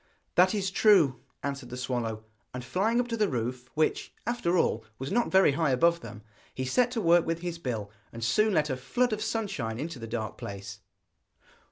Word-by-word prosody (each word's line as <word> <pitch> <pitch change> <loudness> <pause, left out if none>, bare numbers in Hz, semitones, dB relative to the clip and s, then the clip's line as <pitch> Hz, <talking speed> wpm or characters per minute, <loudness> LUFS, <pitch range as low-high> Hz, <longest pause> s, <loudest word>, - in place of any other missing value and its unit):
'That 185 +4 +4
is 195 -2 -1
true,' 180 - +5 0.2
answered 140 -3 -4
the 125 - -6
swallow. 120 -4 -3 0.3
And 125 -1 -5
flying 215 - +1
up 245 - 0
to 230 - -1
the 215 -2 +1
roof, 125 0 -3
which, 155 0 0
after 205 -7 0
all, 110 -8 +1
was 135 +1 -5
not 235 +3 +2
very 190 -5 +5
high 150 +2 +1
above 170 +6 +3
them 110 -9 -10 0.3
he 130 - -2
set 245 - +2
to 235 - -1
work 170 -2 +5
with 165 0 -2
his 175 -1 -4
bill, 110 -9 -4 0.2
and 115 0 -7
soon 215 - +3
let 150 -2 +2
a 130 - -2
flood 245 - 0
of 215 - -3
sunshine 200 - -2
into 155 -2 -5
the 115 - -6
dark 110 -2 -4
place. 100 +1 -7
150 Hz, 200 wpm, -28 LUFS, 120-195 Hz, 0.3 s, true